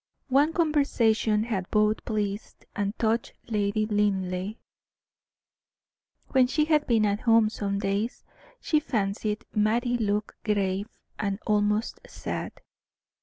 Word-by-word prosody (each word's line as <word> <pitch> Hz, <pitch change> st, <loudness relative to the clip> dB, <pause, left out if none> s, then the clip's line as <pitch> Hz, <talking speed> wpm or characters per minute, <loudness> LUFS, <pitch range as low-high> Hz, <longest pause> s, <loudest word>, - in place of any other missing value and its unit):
One 285 Hz, +4 st, +4 dB
conversation 240 Hz, -10 st, +2 dB
had 200 Hz, -5 st, -3 dB
both 215 Hz, 0 st, +2 dB
pleased 210 Hz, -2 st, -3 dB
and 205 Hz, +1 st, -2 dB
touched 230 Hz, +1 st, 0 dB, 0.2 s
Lady 210 Hz, 0 st, 0 dB
Linleigh. 200 Hz, -2 st, 0 dB, 1.7 s
When 260 Hz, -2 st, +4 dB
she 300 Hz, +4 st, +1 dB
had 305 Hz, -2 st, +2 dB
been 225 Hz, -3 st, +3 dB
at 205 Hz, 0 st, +1 dB
home 225 Hz, -2 st, +4 dB
some 200 Hz, -2 st, -2 dB
days 200 Hz, +4 st, -2 dB, 0.4 s
she 305 Hz, -, +2 dB
fancied 210 Hz, -3 st, -2 dB
Mattie 240 Hz, +3 st, +1 dB
looked 210 Hz, -1 st, -2 dB
grave 200 Hz, -1 st, 0 dB, 0.3 s
and 200 Hz, -2 st, -1 dB
almost 210 Hz, +1 st, +1 dB
sad. -, -, -6 dB
215 Hz, 115 wpm, -27 LUFS, 205-235 Hz, 1.7 s, One